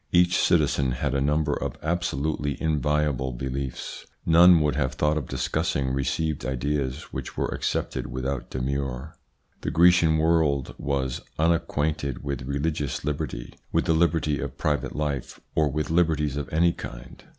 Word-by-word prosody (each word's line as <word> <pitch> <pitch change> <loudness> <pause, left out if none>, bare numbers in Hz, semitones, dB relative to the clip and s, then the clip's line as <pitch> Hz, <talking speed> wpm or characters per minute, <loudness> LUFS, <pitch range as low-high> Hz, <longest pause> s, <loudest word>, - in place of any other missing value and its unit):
Each 90 0 +4
citizen 70 -6 +2
had - - -1
a 70 - +1
number 75 +1 +1
of - - -3
absolutely 75 -3 -1
inviolable 75 -4 0
beliefs; 65 +1 -4 0.2
none 85 +1 +7
would 75 -1 +1
have 65 -3 0
thought 75 +3 +2
of 75 -5 -2
discussing 65 -2 -1
received 70 +3 -1
ideas, 65 +1 -2
which - - -6
were - - 0
accepted - - -2
without 65 +1 -3
demur. 70 +2 -3 0.5
The - - -2
Grecian 85 -2 +5
world 80 -4 +2
was 65 -2 -1 0.2
unacquainted 80 -4 0
with 70 -3 -4
religious 70 -1 -2
liberty, 75 -5 -3 0.2
with - - +1
the 80 - +3
liberty 80 -3 +2
of 70 -1 -5
private 75 -4 -1
life, 75 -4 -3
or 75 -2 +2
with 75 +3 -2
liberties 80 -4 +2
of 75 -2 -4
any 85 +2 +3
kind. - - -9
75 Hz, 145 wpm, -26 LUFS, 65-80 Hz, 0.5 s, none